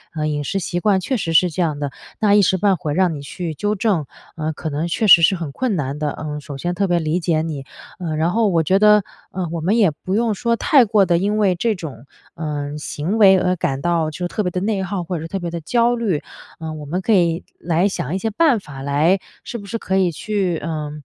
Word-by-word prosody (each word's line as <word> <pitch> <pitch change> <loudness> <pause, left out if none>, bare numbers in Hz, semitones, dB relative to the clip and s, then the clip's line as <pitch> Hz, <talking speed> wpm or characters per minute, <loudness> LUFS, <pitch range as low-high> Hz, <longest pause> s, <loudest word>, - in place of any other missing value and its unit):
呃， 155 0 -1
饮 145 -1 -2
食 195 - -2
习 175 -1 -2
惯 195 -1 +2
确 255 +8 -2
实 165 -7 -2
是 175 +1 +4
这 180 - -2
样 155 -4 0
的， 145 -2 -3 0.3
那 210 -2 +3
一 205 - +6
时 190 0 +2
半 195 +1 +3
会 155 -4 -3
让 180 -3 +2
你 145 - -6
去 160 +3 -5
纠 205 +6 -1
正， 190 -7 0 0.3
呃， 155 -1 -2
可 160 +1 -5
能 155 +4 -2
确 215 +6 -1
实 170 -4 +8
是 190 +4 +4
很 165 -5 -5
困 245 - -1
难 145 -2 -3
的。 150 -1 -1
嗯， 150 -1 -5
首 140 -1 -8
先 175 +5 -2
特 195 +2 0
别 175 - +2
理 160 +1 0
解 160 -2 0
你， 145 -4 -5 0.3
嗯， 160 -3 -3
然 165 +3 +1
后 225 +1 +2
我 170 -4 +2
觉 190 +5 +3
得， 210 -1 +6 0.3
呃， 185 -1 -3
我 170 - -3
们 195 +8 +2
也 200 -8 +4
不 185 +6 -4
用 230 -1 +1
说 235 +3 0
太 275 -2 +4
过 205 -2 +3
得 175 -2 +2
因 205 +3 0
为 200 -4 +3
这 220 +4 0
种， 145 - -8 0.3
嗯， 150 -2 -4
行 165 +8 -3
为 190 -2 +7
而 180 0 +1
感 135 -5 -2
到 170 -2 +1
就 175 +3 -4
特 210 - -2
别 180 - 0
地 180 - -3
内 200 -1 0
耗， 190 -1 -3
或 175 0 -3
者 - - -6
是 - - -5
特 195 - -3
别 175 -2 -4
地 170 - -5
焦 235 +8 +2
虑。 205 -10 -1 0.4
嗯， 155 -1 -6
我 150 - -8
们 175 +6 -2
可 220 - +1
以 170 -3 +2 0.2
来 175 +3 +1
想 175 -3 -3
一 - - +1
些 220 +3 -2
办 270 -2 +3
法 140 -7 -10
来 150 +7 +2 0.2
是 235 - -6
不 200 - -11
是 230 - -3
可 190 -3 -1
以 185 -2 +2
去， 190 -1 -1
呃， 155 -2 -4
175 Hz, 280 characters per minute, -20 LUFS, 155-200 Hz, 0.4 s, 实